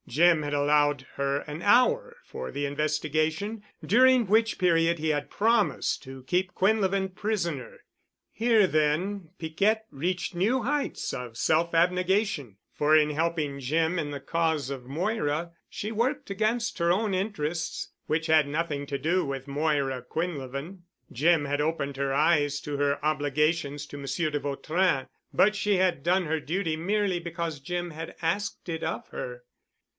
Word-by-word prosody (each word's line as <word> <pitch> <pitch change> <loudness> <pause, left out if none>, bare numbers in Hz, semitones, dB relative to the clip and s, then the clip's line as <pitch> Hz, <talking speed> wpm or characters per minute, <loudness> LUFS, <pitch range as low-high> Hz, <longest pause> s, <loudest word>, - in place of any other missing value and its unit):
Jim 165 +4 +4
had 145 -1 -3
allowed 145 -1 +2
her 140 0 0
an 150 +2 -7
hour 465 - +3
for - - -6
the 145 0 -2
investigation, 155 +7 -1 0.2
during 255 +2 +5
which 220 +3 +2
period 170 -1 +3
he 160 0 -1
had 145 -1 -1
promised 215 -11 +1
to 130 -1 -10
keep 180 +6 0
Quinlevin 195 -1 +2
prisoner. 185 - -3 0.5
Here 225 -2 +4
then, 160 +4 0
Piquette 200 +7 0
reached 175 +7 -2
new 225 +8 +1
heights 290 +4 -2
of 120 -2 -6
self 165 +5 +2
abnegation, 180 - +1 0.2
for 150 +1 +4
in 150 -1 +3
helping 155 -2 -1
Jim 160 +6 0
in 150 - -2
the 145 -1 -5
cause 160 -2 0
of 130 -3 -6
Moira, 165 - -1 0.2
she 210 - -5
worked 235 +5 -1
against 220 +2 0
her 170 0 +3
own 205 +2 +1
interests, 175 -5 -2 0.2
which 160 +1 0
had 155 -2 +4
nothing 145 -1 -2
to 140 - -2
do 175 +6 +1
with 135 -1 -5
Moira 140 -3 0
Quinlevin. 145 +3 -4 0.3
Jim 155 +3 +3
had 145 +1 0
opened 150 -3 -1
her 140 0 -1
eyes 145 0 +2
to 145 - -4
her 140 0 +1
obligations 150 0 0
to 145 - -9
Monsieur 140 +3 -1
de 145 - -1
Vautrin 145 +2 0 0.2
but 210 +2 +4
she 205 -1 +1
had 180 -6 +1
done 180 +1 +2
her 160 0 0
duty 165 +2 -1
merely 190 +2 0
because 170 -3 -4
Jim 175 +2 -3
had 160 +1 -7
asked 200 +6 -2
it 165 -2 -4
of - - -3
her. - - -6
165 Hz, 155 wpm, -27 LUFS, 145-190 Hz, 0.5 s, during